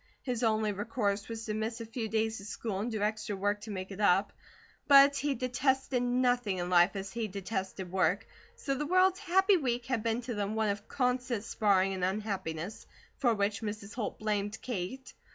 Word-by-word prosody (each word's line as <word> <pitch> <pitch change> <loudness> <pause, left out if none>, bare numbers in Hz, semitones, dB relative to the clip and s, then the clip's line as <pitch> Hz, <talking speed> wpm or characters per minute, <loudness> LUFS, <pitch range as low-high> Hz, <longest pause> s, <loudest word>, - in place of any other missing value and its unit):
His 250 -3 -2
only 220 -2 +2
recourse 205 0 -2
was 225 0 -5
to 215 - -2
miss 220 +2 -3
a 230 - -5
few 225 0 -4
days 220 0 0
of 200 - -9
school 210 -2 -4
and 220 +4 -2
do 215 -3 -2
extra 210 -1 -1
work 205 +1 -1
to 220 - -9
make 190 -1 -5
it 195 - -8
up; 195 -1 +3 0.5
but 280 0 +8
he 285 -1 0
detested 260 0 0
nothing 245 -4 +1
in 175 0 -3
life 175 +2 +5
as 195 0 -4
he 230 -2 -2
detested 190 -2 -4
work, 185 +1 +1 0.3
so 275 - -2
the 290 +2 -2
world's 370 +2 +4
happy 385 0 +4
week 245 -5 -1
had 255 -3 -1
been 230 +2 0
to 240 0 -4
them 205 0 -2
one 220 -1 +1
of 205 +1 -3
constant 250 -4 0
sparring 195 -4 +2
and 185 -1 -3
unhappiness, 190 -2 -3 0.3
for 240 -4 +2
which 200 0 0
Mrs. 210 -1 -5
Holt 225 -5 -3
blamed 210 0 -2
Kate. 245 +3 -5
220 Hz, 195 wpm, -31 LUFS, 200-245 Hz, 0.5 s, but